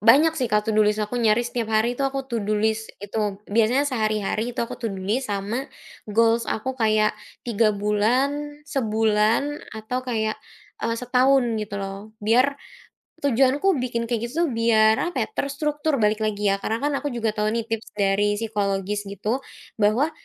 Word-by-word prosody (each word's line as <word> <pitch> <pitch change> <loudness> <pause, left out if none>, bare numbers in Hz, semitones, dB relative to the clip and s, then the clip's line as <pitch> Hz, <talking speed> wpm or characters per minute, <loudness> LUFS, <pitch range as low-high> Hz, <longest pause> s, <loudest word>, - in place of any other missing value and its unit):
banyak 275 - +6
sih, 255 -5 0
kalau 210 0 +3
to 220 - -1
do 215 - +5
list 210 +1 +1
aku 210 +3 -2
nyaris 235 0 +2
tiap 230 -2 -1
hari 225 +3 +2
itu 275 - -2
aku 270 0 -1
to 235 - -2
do 210 - 0
list 220 +1 -1
itu, 205 -1 -2
biasanya 230 +6 +3
sehari-hari 215 -1 -1
itu - - -3
aku - - -7
to 235 - -2
do 190 - -6
list 220 +7 -1
sama 205 +6 -2 0.4
goals 230 +2 +3
aku 260 +4 -2
kayak 215 -2 +2 0.3
3 225 -2 +2
bulan, 255 +9 0
sebulan 225 +2 +1
atau 220 +3 -3
kayak, 220 -3 -1 0.4
eee, 230 0 0
setahun 255 +1 +3 0.2
gitu 205 -1 -5
loh. 195 +2 -7
Biar 240 +6 +3 0.7
tujuanku 280 +6 +3
bikin 235 -2 -2
kayak 230 -1 -1
gitu 315 +8 -1
tuh 330 - +1
biar 220 -1 +4
apa 350 - -1
ya, - - -5
terstruktur 295 -1 -1
balik 215 -3 +2
lagi 210 -2 0
ya. - - +2
Karena 220 +2 -1
kan 290 - +1
aku 290 - -4
juga 235 -5 -1
tahu 210 0 -1
nih 230 - 0
tips 225 -1 -5
dari 205 +1 +2
psikologis 205 -2 -2
gitu, 210 +5 -2 0.4
bahwa 225 +9 +3
225 Hz, 180 wpm, -24 LUFS, 210-255 Hz, 0.7 s, banyak